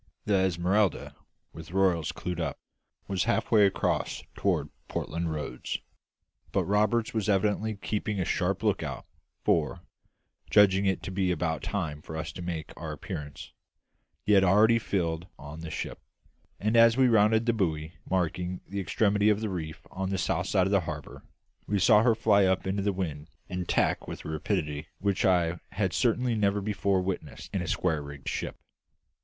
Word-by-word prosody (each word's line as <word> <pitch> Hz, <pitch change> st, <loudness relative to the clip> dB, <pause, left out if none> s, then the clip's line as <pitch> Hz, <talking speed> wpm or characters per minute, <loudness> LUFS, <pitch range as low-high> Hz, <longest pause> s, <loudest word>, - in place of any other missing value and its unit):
The 105 Hz, -, +1 dB
Esmeralda, 95 Hz, +1 st, +1 dB, 0.4 s
with 80 Hz, 0 st, -10 dB
royals 95 Hz, -5 st, +2 dB
clewed 90 Hz, -1 st, -5 dB
up, 80 Hz, -, -2 dB, 0.5 s
was 95 Hz, -1 st, 0 dB
halfway 110 Hz, -2 st, +4 dB
across 95 Hz, -, -1 dB
toward -, -, 0 dB, 0.2 s
Portland 85 Hz, +1 st, -3 dB
Roads; 75 Hz, -5 st, -4 dB, 0.7 s
but -, -, +1 dB
Roberts 105 Hz, +3 st, +1 dB
was 110 Hz, -2 st, -1 dB
evidently 105 Hz, +2 st, +1 dB
keeping 105 Hz, 0 st, -2 dB
a 90 Hz, -, 0 dB
sharp -, -, 0 dB
lookout, -, -, -1 dB, 0.4 s
for, -, -, +1 dB, 0.7 s
judging 100 Hz, -1 st, +5 dB
it 95 Hz, -, 0 dB
to -, -, -5 dB
be 95 Hz, -1 st, 0 dB
about 80 Hz, -2 st, -1 dB
time 80 Hz, -7 st, -3 dB
for 80 Hz, +1 st, -7 dB
us 80 Hz, -, -4 dB
to 90 Hz, -, -8 dB
make 85 Hz, -3 st, -5 dB
our -, -, -6 dB
appearance, 70 Hz, -2 st, -7 dB, 0.7 s
he 105 Hz, -, +2 dB
had 100 Hz, -2 st, +6 dB
already 110 Hz, +5 st, +5 dB
filled 85 Hz, -5 st, -2 dB
on 75 Hz, +2 st, -9 dB
the 80 Hz, -1 st, -6 dB
ship, 75 Hz, -, -5 dB, 0.6 s
and 110 Hz, +3 st, 0 dB
as 115 Hz, +1 st, +6 dB
we 130 Hz, -1 st, +5 dB
rounded 110 Hz, 0 st, +4 dB
the 120 Hz, -, +3 dB
buoy 80 Hz, -6 st, -1 dB, 0.2 s
marking 90 Hz, 0 st, -1 dB
the 100 Hz, +1 st, -4 dB
extremity 100 Hz, +3 st, +2 dB
of 105 Hz, -1 st, +3 dB
the 110 Hz, -1 st, -2 dB
reef 80 Hz, -4 st, -5 dB
on 95 Hz, 0 st, -3 dB
the 95 Hz, -, -1 dB
south 90 Hz, 0 st, 0 dB
side 95 Hz, -3 st, +3 dB
of 95 Hz, -, -1 dB
the 100 Hz, -2 st, +4 dB
harbour, 75 Hz, -2 st, -7 dB, 0.5 s
we 105 Hz, -, +1 dB
saw 105 Hz, +2 st, +6 dB
her 115 Hz, -1 st, +4 dB
fly 105 Hz, -3 st, +4 dB
up 95 Hz, 0 st, +1 dB
into 95 Hz, +1 st, -1 dB
the 100 Hz, +1 st, +1 dB
wind 80 Hz, -5 st, -4 dB, 0.2 s
and 90 Hz, -1 st, -4 dB
tack -, -, +1 dB
with -, -, -7 dB
a -, -, -4 dB
rapidity 75 Hz, -1 st, -2 dB
which 100 Hz, -1 st, 0 dB
I 90 Hz, -2 st, +2 dB
had 95 Hz, -3 st, 0 dB
certainly 125 Hz, +2 st, +2 dB
never 105 Hz, -2 st, +2 dB
before 100 Hz, -2 st, 0 dB
witnessed 95 Hz, 0 st, -5 dB
in -, -, 0 dB
a -, -, -4 dB
square 80 Hz, -4 st, 0 dB
rigged 70 Hz, -1 st, -10 dB
ship. -, -, -3 dB
95 Hz, 170 wpm, -28 LUFS, 85-105 Hz, 0.7 s, had